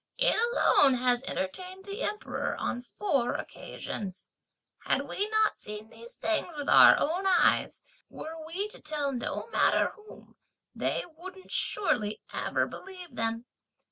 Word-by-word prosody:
it - - +4 0.2
alone 270 -3 +5
has 245 0 +2
entertained 370 - -3
the 400 +4 -6
Emperor 420 0 -2
on 245 - -2
four 255 -3 -1
occasions! 190 -3 -6 0.5
Had - - 0
we 410 +2 -2
not 435 0 +2
seen 210 +1 -8
these 475 +1 -13
things 330 0 -1
with 290 - -4
our - - +9
own 360 +6 0
eyes, 365 -2 +3 0.3
were 320 +1 -8
we 355 +6 -3
to - - -9
tell 300 -2 -1
no 250 -3 -3
matter - - +3
whom, 425 0 -16 0.4
they - - -1
wouldn't 375 +3 -11
surely 215 - 0
ever - - 0
believe 365 -7 -10
them! 225 0 -1
320 Hz, 140 wpm, -29 LUFS, 245-385 Hz, 0.5 s, our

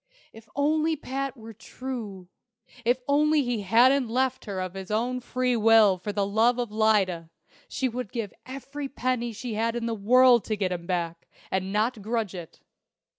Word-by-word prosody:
If 225 0 -15
only 310 +2 +1
Pat 275 -1 -4
were 225 0 -10
true 220 -4 -7 0.6
if 245 +2 +1
only 300 +1 +3
he 240 -4 -2
hadn't 240 +5 +4
left 260 +2 0
her 200 -3 -4
of 185 -1 -4
his 190 -1 -8
own 240 +4 -1
free 250 0 -1
will 220 -4 +5
for 205 +3 -4
love 215 +4 +2
of 240 -3 -3
Lyda, 200 -6 +1 0.4
she 265 - -1
would 245 -3 -5
give 220 -6 -4
every 275 +2 -7
penny 250 -3 -2
she 230 +2 -6
had 225 +2 -1
in 235 -1 -2
the 230 - -1
world 240 +2 +5
to 215 - -2
get 190 -2 -1
him 170 -1 -5
back, 170 -2 -3 0.2
and 190 0 -1
not 215 +2 0
grudge 220 -2 -2
it! 175 -3 -10
230 Hz, 175 wpm, -26 LUFS, 205-255 Hz, 0.6 s, will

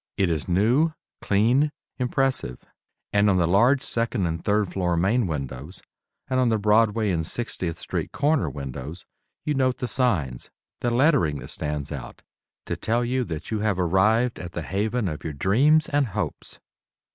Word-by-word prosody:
It 95 -3 +2
is 80 -3 -2
new, 120 - +3 0.3
clean, 120 +9 +2 0.3
impressive; 125 - 0 0.6
and 105 0 +4
on 95 - +3
the 85 - +3
large 120 +10 +4
second 115 -4 0
and 80 -1 -3
third 105 -2 +1
floor 90 -3 0
main 100 +6 +2
windows, 70 +2 -6 0.4
and 130 - 0
on 125 -2 +3
the 110 - +2
Broadway 105 0 +3
and 80 -2 0
60th 90 -3 -2
Street - - -4
corner 145 +1 +1
windows, 70 +4 -7 0.4
you 150 - +1
note 130 -2 +1
the 125 - -3
signs, 90 - 0 0.3
the 120 - 0
lettering 120 - +3
that - - -8
stands 75 -2 -4
out, - - -8 0.4
to - - -3
tell 120 +2 0
you 130 +1 0
that 80 0 -6
you 110 - 0
have 105 -3 0
arrived 105 +7 +2
at 90 -1 -7
the 85 - -4
haven 105 +5 -1
of 75 -3 -5
your 80 - -4
dreams 135 - +3
and 145 -2 +1
hopes. 100 - -5
105 Hz, 170 wpm, -25 LUFS, 85-125 Hz, 0.6 s, and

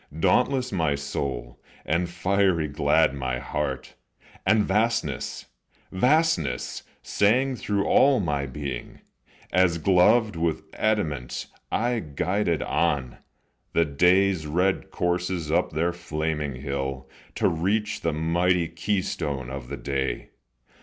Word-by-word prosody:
Dauntless 130 +8 +2
my 80 -7 +1
soul, 65 -4 -4 0.3
and 85 +2 0
fiery 90 -2 +1
glad 75 +1 +2
my 65 -2 -2
heart, - - -4 0.5
And 105 +1 +5
"vastness," 115 +4 -1 0.5
"vastness," 125 - +1 0.2
sang 125 +6 +2
through 100 -3 -1
all 135 -1 +5
my 75 -7 -1
being, 65 -2 -6 0.5
As 90 -1 +3
gloved 100 +5 +4
with 80 -1 -1
adamant 75 - -1 0.3
I 120 +1 +1
guided 85 +2 -1
on 70 -8 0 0.5
The 85 - +3
day's 90 +3 +3
red 90 +5 0
coursers 90 -2 -1
up 85 +3 +1
their 85 +3 0
flaming 75 -4 -3
hill, 65 -1 -3 0.3
To - - +2
reach 100 +6 0
the 85 - 0
mighty 85 +2 +1
keystone 80 -7 -2
of 65 -2 -6
the 70 +2 -5
day. 70 -1 -3
85 Hz, 110 wpm, -25 LUFS, 70-100 Hz, 0.5 s, And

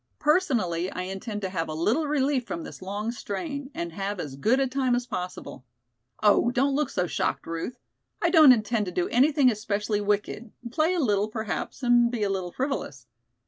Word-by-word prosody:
Personally 235 - +1
I 180 - -4
intend 200 +3 -5
to 190 - -1
have 165 -3 -2
a 155 - -4
little 225 - +1
relief 275 -3 +1
from 170 - -4
this - - -10
long 205 +4 -3
strain 270 - -5
and 170 -9 -4
have 195 +2 -4
as 145 -5 -5
good 220 - +2
a 270 - +3
time 260 -1 +1
as 245 0 -2
possible. 180 - -6 0.6
Oh, 210 +3 +5
don't 270 +3 +1
look 290 -1 0
so 180 - 0
shocked, - - -2
Ruth. 165 +9 -4 0.4
I - - +1
don't 310 -6 +9
intend 220 -3 +1
to - - -3
do 175 0 0
anything 275 +1 +4
especially 210 -1 -1
wicked, 210 +2 -1 0.2
play 320 +5 +2
a - - 0
little 210 -7 +2
perhaps 220 +4 -4
and 240 -1 +5
be 235 -3 -2
a 200 - +1
little 185 -2 -3
frivolous. 170 - -3
220 Hz, 190 wpm, -26 LUFS, 190-265 Hz, 0.6 s, don't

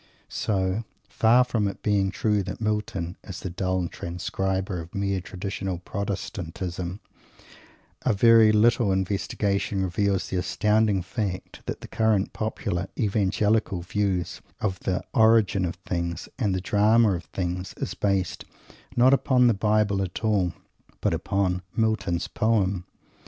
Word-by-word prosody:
So, 95 +1 -1 0.2
far 120 +3 +4
from 115 -4 0
it 100 - -6
being 100 -2 +2
true 105 +1 +1
that 95 - -6
Milton 105 -5 -2
is 95 -3 -8
the 95 - -4
dull 95 0 -1
transcriber 95 +1 -3
of 85 +5 -12
mere 100 -1 0
traditional 95 0 -4
Protestantism, 90 -1 -4 1.0
a - - +2
very 115 +1 +6
little 110 0 +4
investigation 100 +1 0
reveals 95 +1 0
the 95 - -1
astounding 105 +1 +2
fact 100 -2 -4
that - - -4
the - - -8
current 110 -3 +1
popular 95 -4 -2
Evangelical 105 -1 +1
view 95 -1 0 0.3
of 95 -4 -1
the 90 -1 -1
origin 110 -4 +4
of 85 - -3
things 85 -1 -3
and 100 -6 +1
the 95 - -2
drama 105 +3 +4
of 85 -2 -4
things 90 0 -4
is - - -3
based, 95 -3 -1 0.5
not 125 +2 +6
upon 130 -2 +4
the 120 - +5
Bible 105 -1 +2
at 95 +3 -4
all, 100 -5 +2 0.5
but - - +1
upon 95 -2 0
Milton's 100 -6 0
poem. 100 -5 +1
100 Hz, 135 wpm, -26 LUFS, 95-110 Hz, 1.0 s, very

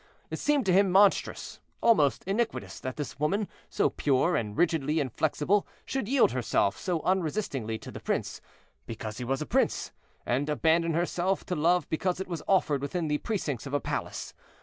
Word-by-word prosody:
It - - -3
seemed 295 -4 +2
to 185 - +3
him 195 +1 +5
monstrous, 195 +2 +2 0.2
almost 155 - +3
iniquitous, 220 +4 -2
that 130 -1 -5
this 145 -2 -6
woman, 195 +7 +1 0.2
so - - +1
pure 145 +5 +2
and 105 -2 -2
rigidly 160 -3 +2
inflexible, 150 - +1 0.2
should 265 -6 -2
yield 265 - +4
herself 120 -5 +1
so 175 -4 -2
unresistingly 155 - -1
to - - -10
the - - -8
prince, - - -2 0.5
because 110 0 -6
he - - -3
was 135 +4 -1
a - - -7
prince, - - 0 0.3
and 135 +5 0
abandon 165 +2 +2
herself 175 +2 0
to 180 - -2
love 170 +2 +2
because 180 +3 -1
it 190 - -4
was 170 -4 -4
offered 155 -8 +2
within 160 +3 -2
the 150 0 +1
precincts 145 - -3
of 140 - -3
a - - +2
palace. - - -4
160 Hz, 175 wpm, -28 LUFS, 140-190 Hz, 0.5 s, him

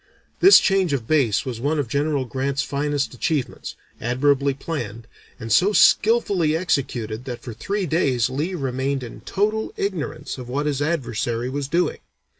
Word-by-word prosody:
This 385 +2 +9
change 190 -5 +2
of 125 -5 -2
base 130 -7 +2
was 120 -3 -5
one 150 +4 0
of 145 -4 -1
General 140 +1 0
Grant's 135 +2 -2
finest 145 0 -2
achievements, 140 +1 -3 0.3
admirably 140 +3 +1
planned, 120 -7 -5 0.3
and 115 0 -6
so 190 - +4
skilfully 200 -9 +4
executed 125 -9 -2
that 125 -2 -6
for 120 - -6
three 200 - -2
days 135 -8 +1
Lee 150 +8 -3
remained 135 -2 -2
in 120 - -9
total 215 +2 -1
ignorance 190 -8 -3
of 125 -1 -8
what 140 +4 -1
his 145 -2 -1
adversary 120 -5 -1
was 140 0 -3
doing. 170 +5 0
140 Hz, 155 wpm, -22 LUFS, 125-160 Hz, 0.3 s, This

